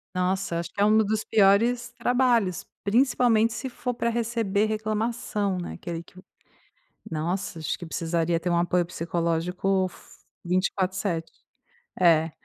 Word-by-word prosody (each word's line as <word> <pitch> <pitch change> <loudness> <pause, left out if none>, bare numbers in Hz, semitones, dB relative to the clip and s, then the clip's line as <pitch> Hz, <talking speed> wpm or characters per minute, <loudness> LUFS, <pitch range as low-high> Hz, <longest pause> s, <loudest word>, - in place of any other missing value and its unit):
Nossa 185 -2 0
acho 170 +1 -5
que - - -10
é 205 - +5
um 215 +1 +4
dos 215 0 +1
piores 230 +4 +3
trabalhos, 235 -7 +2 0.2
principalmente 230 0 +3
se 265 +3 -4
for 250 -1 -4
para 235 - 0
receber 225 -3 0
reclamação 215 -2 -1
né, 175 - -5
aquele 170 -1 -6
que - - -21 1.0
nossa 170 +2 -3
acho 155 - -2
que 175 - -8
precisaria 165 0 -1
ter 180 - -2
um 170 - +2
apoio 175 0 +2
psicológico 175 +3 -1
for - - -18 0.3
24/7, 185 -1 -1 0.7
é, 165 -2 +5
195 Hz, 135 wpm, -26 LUFS, 175-225 Hz, 1.0 s, é